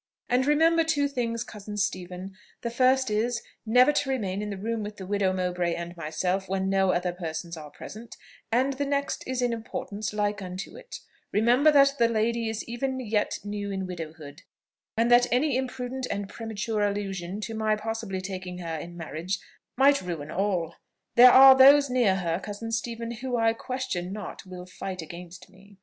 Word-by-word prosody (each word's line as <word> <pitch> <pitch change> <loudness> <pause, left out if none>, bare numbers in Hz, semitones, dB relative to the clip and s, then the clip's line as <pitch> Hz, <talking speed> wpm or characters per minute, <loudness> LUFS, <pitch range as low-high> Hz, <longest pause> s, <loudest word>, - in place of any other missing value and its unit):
And 255 +2 +2
remember 325 +3 +4
two 290 -3 +1
things, 235 -4 -2
cousin 210 -1 -8
Stephen: 185 -1 -3 0.3
the 235 - -2
first 255 0 +3
is, 230 +3 0 0.3
never 250 +5 +6
to 290 -2 0
remain 205 -7 -1
in 210 - -4
the 200 - -4
room 225 +3 -2
with 210 0 -6
the 190 - -7
widow 200 -1 +1
Mowbray 180 -2 -1
and 170 +1 -6
myself, 180 +4 -2
when 190 0 0
no 195 -1 +3
other 175 0 0
persons 170 -1 -5
are 155 -2 -9
present; 220 +9 -10 0.3
and 260 +4 +2
the 285 +2 -2
next 280 0 -1
is 255 -1 -1
in 240 -1 +1
importance 225 -2 -5
like 205 0 -1
unto 185 +1 -6
it, - - -10 0.3
remember 245 +8 +4
that 275 0 +5
the 235 - +5
lady 230 0 0
is 220 -1 -3
even 260 +3 -3
yet 215 -4 0
new 205 0 -4
in 190 -1 -3
widowhood, 160 -4 -8 0.6
and 230 +1 +2
that 245 0 +6
any 260 +3 +2
imprudent 255 0 -3
and 200 0 -3
premature 220 0 -3
allusion 200 -2 -2
to 225 - -5
my 220 -1 +1
possibly 220 -3 -4
taking 185 -2 -6
her 165 -2 -4
in 175 +3 -7
marriage 170 +3 -3 0.4
might 280 +1 +5
ruin 165 -5 -5
all. 180 -4 -1 0.4
There 250 +1 +9
are 265 +1 +10
those 275 +1 +7
near 240 -7 +3
her, 170 -2 -1
cousin 210 +3 -6
Stephen, 230 +1 -3
who 245 +1 -3
I 225 0 +3
question 230 -8 -4
not 210 -1 -7
will 180 -1 -8
fight 185 -1 -6
against 175 +2 -11
me." 195 +1 -19
210 Hz, 180 wpm, -27 LUFS, 185-245 Hz, 0.6 s, are